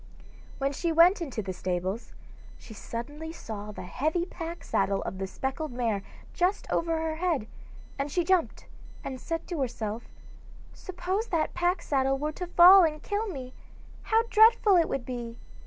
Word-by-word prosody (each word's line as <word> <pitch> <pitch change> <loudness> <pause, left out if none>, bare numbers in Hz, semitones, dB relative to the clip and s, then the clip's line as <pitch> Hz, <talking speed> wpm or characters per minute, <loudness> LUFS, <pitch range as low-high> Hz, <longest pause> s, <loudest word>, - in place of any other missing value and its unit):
When 275 +1 -1
she 335 +4 -1
went 345 +4 +5
into 260 -9 -4
the 190 -1 -4
stables, 185 +4 -3 0.5
she 225 - -12
suddenly 290 +9 -6
saw 210 -9 -7
the 205 - -8
heavy 310 - -1
pack 335 -1 -7
saddle 195 0 0
of 190 - -5
the 190 - -2
speckled 265 +8 -4
mare 230 -5 -1 0.3
just 365 +3 0
over 330 -1 +1
her 320 -1 -2
head, 330 -9 0 0.5
and 280 +1 -2
she 350 - +1
jumped 370 -1 +1 0.4
and 260 -2 -6
said 330 -1 -3
to 340 -5 -2
herself: 225 -3 -3 0.7
'Suppose 375 +4 -3
that 325 -6 0
pack 355 +1 0
saddle 270 -1 +1
were 300 +2 -2
to 360 +3 -6
fall 360 +2 +8
and 305 -2 0
kill 420 +2 -2
me, 260 -9 -7 0.5
how 450 +1 +2
dreadful 440 -2 +6
it 335 -2 +3
would 270 -3 -3
be! 240 -2 -6
305 Hz, 165 wpm, -28 LUFS, 240-350 Hz, 0.7 s, fall